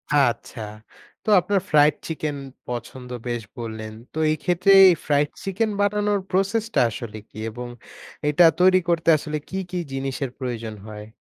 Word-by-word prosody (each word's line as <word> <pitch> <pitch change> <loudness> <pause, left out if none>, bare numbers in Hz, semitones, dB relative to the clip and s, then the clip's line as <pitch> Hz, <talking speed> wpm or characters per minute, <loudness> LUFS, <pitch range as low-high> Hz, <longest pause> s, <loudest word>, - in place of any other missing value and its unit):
আচ্ছা। 125 -3 +1 0.6
তো - - -3
আপনার 195 +3 +1
fried 150 0 +5
chicken 155 -2 -3 0.3
পছন্দ 125 +1 -6 0.2
বেশ 120 -1 -2 0.2
বললেন। 110 -2 -6 0.2
তো - - -8
এই 155 - 0
ক্ষেত্রে 180 +3 +3
এই 185 - +8
fried 145 0 +2
chicken 195 +3 -1
বানানোর 205 0 +1
process 195 +4 +1
টা - - +5
আসলে 110 0 -7
কী? - - -15
এবং 120 +2 -7 0.6
এটা 155 +4 +5 0.2
তৈরি 185 +1 +6
করতে 170 -1 +2
আসলে 150 +1 -4
কী, 190 - -4
কী 180 - -2 0.2
জিনিসের 135 0 -3
প্রয়োজন 115 -4 -4
হয়? 105 0 -9
150 Hz, 155 wpm, -23 LUFS, 120-185 Hz, 0.6 s, এই